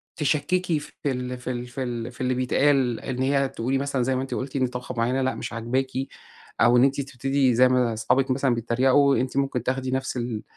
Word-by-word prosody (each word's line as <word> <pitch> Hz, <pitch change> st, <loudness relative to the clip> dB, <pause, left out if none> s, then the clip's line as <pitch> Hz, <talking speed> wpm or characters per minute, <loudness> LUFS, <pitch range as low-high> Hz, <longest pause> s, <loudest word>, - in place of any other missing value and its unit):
تشكِّكي 160 Hz, +3 st, 0 dB
في 145 Hz, -, -12 dB, 0.2 s
ال 125 Hz, 0 st, -4 dB
في 125 Hz, +1 st, -5 dB
ال 120 Hz, -1 st, -4 dB
في 125 Hz, +2 st, -5 dB
ال 120 Hz, -1 st, -4 dB
في 120 Hz, -, -11 dB
اللي 130 Hz, 0 st, +1 dB
بيتقال. 130 Hz, -1 st, +2 dB
إن 130 Hz, -1 st, -4 dB
هي 135 Hz, 0 st, +2 dB
تقولي 130 Hz, +3 st, -1 dB
مثلًا 140 Hz, -1 st, -1 dB
زي 130 Hz, +2 st, +1 dB
ما 130 Hz, -, -1 dB
أنتِ 135 Hz, -, -5 dB
قُلتِ، 130 Hz, +1 st, -4 dB
إن 130 Hz, -2 st, +2 dB
طبخة 125 Hz, 0 st, -6 dB
مُعيَّنة 125 Hz, +3 st, +1 dB
لأ 130 Hz, 0 st, 0 dB
،مش 115 Hz, -, -6 dB
عاجباكِ 120 Hz, +4 st, -1 dB, 0.7 s
أو 120 Hz, +1 st, +6 dB
إن 120 Hz, -, +6 dB
أنتِ 140 Hz, +1 st, +2 dB
تبتدي 135 Hz, -1 st, 0 dB
زي 130 Hz, +2 st, +6 dB
ما 125 Hz, -2 st, +2 dB
أصحابك 130 Hz, +4 st, +1 dB
مثلًا 130 Hz, -1 st, +1 dB
بيتَّريقوا، 130 Hz, +4 st, +3 dB
إن -, -, +1 dB
أنتِ 130 Hz, +1 st, -3 dB
ممكن 135 Hz, -3 st, 0 dB
تاخدي 130 Hz, 0 st, -2 dB
نفْس 130 Hz, 0 st, -2 dB
ال 120 Hz, -3 st, -3 dB
130 Hz, 220 wpm, -25 LUFS, 125-135 Hz, 0.7 s, أو